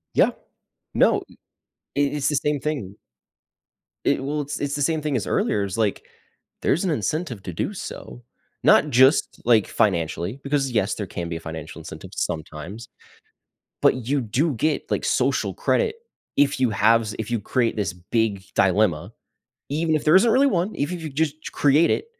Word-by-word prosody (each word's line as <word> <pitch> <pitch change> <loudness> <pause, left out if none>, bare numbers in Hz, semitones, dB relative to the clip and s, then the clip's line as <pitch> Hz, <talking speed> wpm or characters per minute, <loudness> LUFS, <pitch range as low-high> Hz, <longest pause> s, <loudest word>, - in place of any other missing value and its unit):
Yeah. - - +5 0.6
No - - +3 0.7
It 145 0 +1
it's 145 -2 0
the 150 - +1
same 145 0 0
thing. 135 -10 -3 1.1
It 135 - +2
well, 150 +2 -1
it's 145 +1 -5
it's 145 0 -2
the 145 - -3
same 160 +2 +1
thing 150 -2 -1
as 105 - -4
earlier, 100 - +1
is 100 +2 -4
like, 110 -3 0 0.6
there's 175 +6 +1
an - - +1
incentive 125 - -2
to 90 - -6
do - - -2
so, - - -8 0.4
not - - +5
just, 130 +4 +4
like, 115 -4 +4
financially 90 - 0
because, 140 -2 0
yes, 110 -3 +1
there 105 -3 -5
can 85 -1 -5
be 85 - -3
a - - -8
financial 80 -2 -7
incentive - - -10
sometimes, 80 +7 -5 1.0
but 125 -3 +3
you 140 0 +2
do 135 +7 0
get, 155 +6 -1
like, - - 0
social - - +1
credit 460 -2 +1 0.4
if 145 -1 +3
you 125 -3 +3
have 115 +2 +3
z - - -5
if 110 +1 -4
you 120 - +1
create 115 +2 0
this 100 -4 -1
big 100 +2 -1
dilemma, 95 -4 +2 0.6
even 160 +2 +1
if 155 - -2
there 155 - +6
isn't 225 +4 +6
really 275 +2 +5
one, 185 -1 0
eve 145 +6 -2
if 175 - -5
you 155 - -4
just 155 +2 -2
create 145 +4 +4
it - - 0
130 Hz, 180 wpm, -23 LUFS, 100-150 Hz, 1.1 s, there